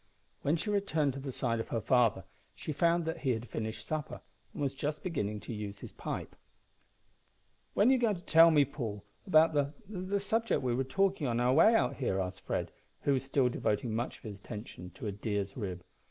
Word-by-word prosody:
When 145 +3 +2
she 210 +6 -2
returned 160 -9 +1
to 135 - -6
the 135 0 -5
side 115 -2 -1
of 115 - -3
her 115 - 0
father 115 0 +3 0.3
she 155 - -4
found 170 +2 +2
that 160 - -3
he 130 -4 +1
had 115 +1 -5
finished 110 -1 -4
supper, 155 +2 -3 0.3
and - - -10
was 140 -2 0
just 150 +2 -3
beginning 105 - -2
to 115 - -6
use 105 -2 -5
his - - -8
pipe. - - -5 1.4
"When 210 +5 +5
are - - +6
you 265 - +5
going 225 -4 +2
to 175 - -9
tell 165 0 +7
me, 150 -3 +5
Paul, 115 -8 -5 0.2
about 160 -2 +5
the 145 0 0
the 195 0 -2
subject 225 - 0
we 125 -2 +1
were 130 +2 +1
talking 190 +1 +1
of - - 0
on 115 - 0
our 125 +1 +3
way 220 +10 +5
here?" 95 -7 0
asked 95 0 -3
Fred, - - -2 0.3
who 140 - +2
was 130 - 0
still 135 -1 +2
devoting 115 -1 -1
much 120 +3 -2
of - - -25
his 105 -3 -7
attention 105 -4 -8
to - - -8
a 105 - -1
deer's 100 0 -3
rib. 95 -6 -4
135 Hz, 215 wpm, -32 LUFS, 110-160 Hz, 1.4 s, tell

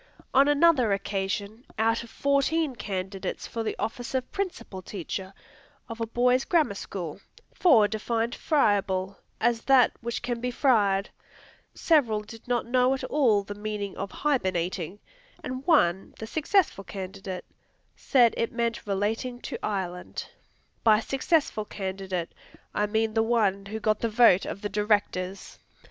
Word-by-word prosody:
On 275 +2 +6
another 290 -6 +4
occasion, 200 +3 -2
out 225 +1 +2
of 230 - -11
fourteen 280 +2 +1
candidates 195 -3 -4
for 230 - -4
the 225 - -2
office 245 +3 -4
of 255 -1 -2
Principal 365 - -4
teacher 190 0 -5 0.6
of 230 -1 -7
a 225 - -1
boys' 250 +3 +2
Grammar 315 - +2
school, 190 -3 -6 0.3
four 235 - +5
defined 225 +2 -1
"friable" 195 - +1 0.2
as 235 0 +2
that 265 -3 +6
which 235 0 -4
can 240 -1 -2
be 250 - -1
fried; 210 -7 +2 0.6
several 245 -10 +3
did 225 +2 -13
not 245 -1 0
know 250 +2 +3
at 265 - -7
all 235 -9 +2
the 205 - -6
meaning 205 -1 -4
of 195 - -4
"hibernating," 185 - -1 0.5
and 255 +1 -5
one, 190 - +3
the 220 - -6
successful 315 - +1
candidate, 190 -1 -6 0.5
said 240 -4 +4
it 230 - 0
meant 235 -2 -2
"relating 220 +5 -1
to - - -6
Ireland." 180 -3 -4 0.6
By 215 -2 +6
"successful" 270 -1 0
candidate, 190 -3 -4 0.4
I 210 - +1
mean 220 +1 0
the 225 - +3
one 210 -4 +1
who 220 +2 -4
got 215 -1 +1
the 230 - 0
vote 220 -4 +5
of 200 - -5
the 205 - -1
Directors! 205 -2 -1
220 Hz, 145 wpm, -27 LUFS, 195-250 Hz, 0.6 s, On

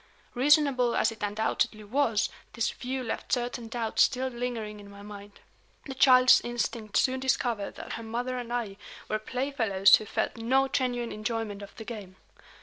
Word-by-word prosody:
Reasonable 270 -2 +3
as - - +2
it 220 - -12
undoubtedly 215 +1 -1
was, 225 -1 +1 0.2
this 230 - 0
view 260 +1 -4
left 225 - -5
certain 240 -1 -1
doubts 225 -1 -1
still 260 0 +2
lingering 235 -4 -4
in 200 0 -12
my 200 0 -12
mind. 205 0 -11 0.4
The 270 - -5
child's 255 -1 +6
instinct 235 -3 -2
soon 260 0 +2
discovered 245 -5 -1
that - - -7
her 230 - -5
mother 245 +3 -3
and 240 -1 -7
I 225 -5 -3 0.3
were 215 - -1
playfellows 225 -6 +3
who 215 - -8
felt 225 - -2
no 260 +4 +2
genuine 245 -3 -1
enjoyment 215 -1 -3
of 200 - -11
the 220 - -9
game. 205 -6 -8
235 Hz, 165 wpm, -28 LUFS, 215-255 Hz, 0.4 s, child's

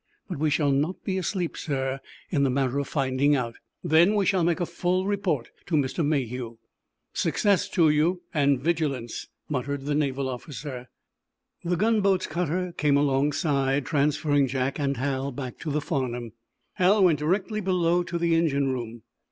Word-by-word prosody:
But - - -5
we 155 0 +2
shall 145 0 +2
not 150 +7 -1
be 190 -1 -1
asleep, 180 -2 -2
sir, 135 -2 -2 0.3
in 150 -6 +2
the 140 - +3
matter 135 +1 0
of 140 - -3
finding 140 0 +2
out. 120 -3 -3 0.3
Then 170 +4 +4
we 200 -2 +2
shall 185 -1 +2
make 170 +1 +1
a 175 - 0
full 180 +2 -1
report 195 - -1 0.2
to 170 - 0
Mr. 145 +3 0
Mayhew." 125 -5 -2 0.6
"Success 200 -3 +1
to 165 -3 +3
you—and 150 -3 +1
vigilance!" 145 -7 -2 0.2
muttered 140 0 -3
the 145 - 0
naval 140 -2 0
officer. 130 -1 -6 0.7
The 175 +1 0
gunboat's 200 -2 +2
cutter 175 +2 -2
came 145 -2 +3
alongside, 140 -1 +1
transferring 145 -1 +2
Jack 130 +2 -2
and 140 -1 0
Hal 135 +1 -1
back 130 -1 -6
to 160 - -4
the 150 +1 0
"Farnum." 125 -6 -3 0.5
Hal 195 +2 +4
went 165 -5 +4
directly 195 +7 0
below 180 -2 +2
to 175 0 -3
the 170 0 +1
engine 140 -5 +2
room. 120 -2 -6
150 Hz, 160 wpm, -26 LUFS, 135-175 Hz, 0.7 s, Then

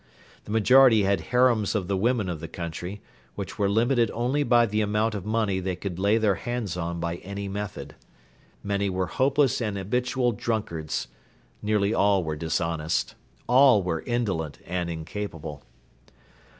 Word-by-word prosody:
The - - -8
majority 115 0 +6
had 100 -2 +1
harems 120 -4 +3
of 95 -4 -1
the 100 - 0
women 110 +1 +1
of 85 -3 -4
the 85 - -6
country, 90 +4 -6 0.3
which - - -6
were 100 -1 +2
limited 115 +2 +2
only 125 +5 0
by 120 -3 +4
the 105 0 -1
amount 105 +1 +1
of 100 -2 -5
money 110 -3 0
they 95 0 -2
could 90 -1 -5
lay 100 +3 +3
their 110 -3 +3
hands 120 -7 -3
on 85 -1 -3
by 85 0 -2
any 100 +2 -6
method. 100 +1 -5 0.7
Many 100 0 0
were 95 0 -1
hopeless 135 +5 +1
and 105 -3 -2
habitual 125 +5 0
drunkards. 100 - -3 0.5
Nearly 105 0 +1
all 100 -3 +3
were 80 -1 -3
dishonest. 80 0 -1 0.3
All 125 -4 +5
were 80 -3 -2
indolent 95 -11 -1
and 90 -1 -2
incapable. 80 -2 -6
100 Hz, 155 wpm, -26 LUFS, 90-115 Hz, 0.7 s, majority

